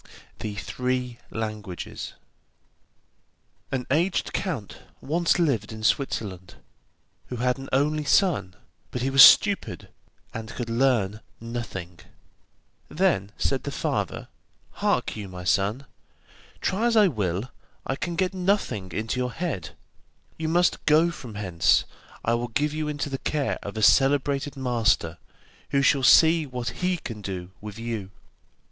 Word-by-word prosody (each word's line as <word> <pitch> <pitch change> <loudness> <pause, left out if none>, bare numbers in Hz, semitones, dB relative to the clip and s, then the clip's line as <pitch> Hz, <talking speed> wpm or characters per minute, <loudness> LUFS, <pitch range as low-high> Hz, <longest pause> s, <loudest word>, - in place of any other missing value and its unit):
THE 105 -1 -4
THREE 125 +2 -3
LANGUAGES 110 -4 -5 1.6
An 130 -2 -2
aged 170 +6 +1
count 145 - -3 0.2
once 170 +4 +1
lived 140 - +1
in 110 0 -8
Switzerland, 100 -8 -1 0.7
who 125 - -5
had 125 +2 0
an 135 - -8
only 150 +3 +1
son, 145 - +2 0.3
but 125 - -4
he 135 - 0
was 135 0 +7
stupid, 200 +9 +6 0.4
and 110 -1 -6
could 115 -2 -4
learn 115 -5 +1 0.2
nothing. 110 -7 -6 0.9
Then 155 - +1
said - - 0
the - - -5
father: - - -2 0.4
'Hark - - 0
you, 105 -2 -6
my 90 -1 -8
son, 100 +8 +1 0.8
try 215 +5 +1
as 230 -1 +2
I 210 -2 +7
will 105 - -2 0.3
I 135 - -1
can 170 +4 -4
get 185 +1 0
nothing 180 - -1
into 110 +4 -2
your 125 0 -1
head. 145 - -4 0.6
You 160 0 -3
must 175 +2 +2
go 160 +3 +5
from 125 -9 -9
hence, 90 -5 +2 0.4
I 115 - +2
will 120 +1 -1
give 145 +6 -1
you 155 0 -2
into 145 -1 -2
the 135 - -3
care 145 -3 -1
of 100 +2 -7
a 110 - -1
celebrated 140 +2 +3
master, 115 -10 +1 0.5
who 140 0 +2
shall 140 -1 +4
see 160 +4 +6
what 125 -2 -3
he 180 0 +1
can 115 -9 -7
do 95 -2 -5
with 105 0 -8
you. 115 -4 -4
125 Hz, 140 wpm, -25 LUFS, 105-150 Hz, 1.6 s, was